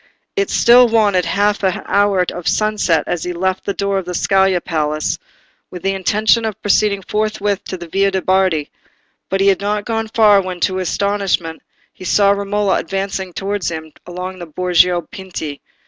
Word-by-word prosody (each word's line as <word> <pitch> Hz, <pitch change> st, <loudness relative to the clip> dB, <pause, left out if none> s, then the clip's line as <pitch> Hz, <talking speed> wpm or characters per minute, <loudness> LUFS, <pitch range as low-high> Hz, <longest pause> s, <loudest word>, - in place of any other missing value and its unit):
It 400 Hz, -1 st, 0 dB
still 245 Hz, +1 st, +6 dB
wanted 205 Hz, -6 st, +2 dB
half 205 Hz, +1 st, +1 dB
an 190 Hz, -3 st, -1 dB
hour 200 Hz, -2 st, +2 dB
of 175 Hz, -1 st, -6 dB
sunset 210 Hz, -7 st, +1 dB
as 175 Hz, -, -3 dB
he 180 Hz, -, -3 dB
left 185 Hz, +2 st, -2 dB
the 200 Hz, -, 0 dB
door 200 Hz, -1 st, 0 dB
of 190 Hz, -, -7 dB
the 180 Hz, 0 st, -4 dB
Scala 190 Hz, 0 st, +2 dB
palace, 155 Hz, -2 st, -2 dB, 0.5 s
with 180 Hz, -2 st, -9 dB
the 195 Hz, 0 st, +1 dB
intention 215 Hz, +4 st, +2 dB
of 220 Hz, -2 st, -3 dB
proceeding 205 Hz, -1 st, +1 dB
forthwith 210 Hz, -1 st, -1 dB
to 185 Hz, -, -5 dB
the 170 Hz, -1 st, -9 dB
Via 195 Hz, +4 st, +1 dB
de' 190 Hz, -1 st, -2 dB
Bardi; 185 Hz, -5 st, +1 dB, 0.6 s
but 195 Hz, 0 st, 0 dB
he 195 Hz, -, +3 dB
had 195 Hz, 0 st, +1 dB
not 205 Hz, 0 st, -1 dB
gone 225 Hz, -1 st, -2 dB
far 215 Hz, -3 st, +4 dB
when, 185 Hz, -1 st, -6 dB
to 185 Hz, -, +1 dB
his 185 Hz, -2 st, -2 dB
astonishment, 195 Hz, -5 st, -1 dB, 0.3 s
he -, -, -13 dB
saw 200 Hz, +2 st, +3 dB
Romola 200 Hz, 0 st, 0 dB
advancing 195 Hz, -1 st, -4 dB
towards 195 Hz, +1 st, -3 dB
him 160 Hz, -2 st, -7 dB
along 180 Hz, +1 st, -6 dB
the 175 Hz, -, -7 dB
Borgo 180 Hz, +1 st, +2 dB
Pinti. 185 Hz, -8 st, -7 dB
195 Hz, 180 wpm, -17 LUFS, 180-205 Hz, 0.6 s, still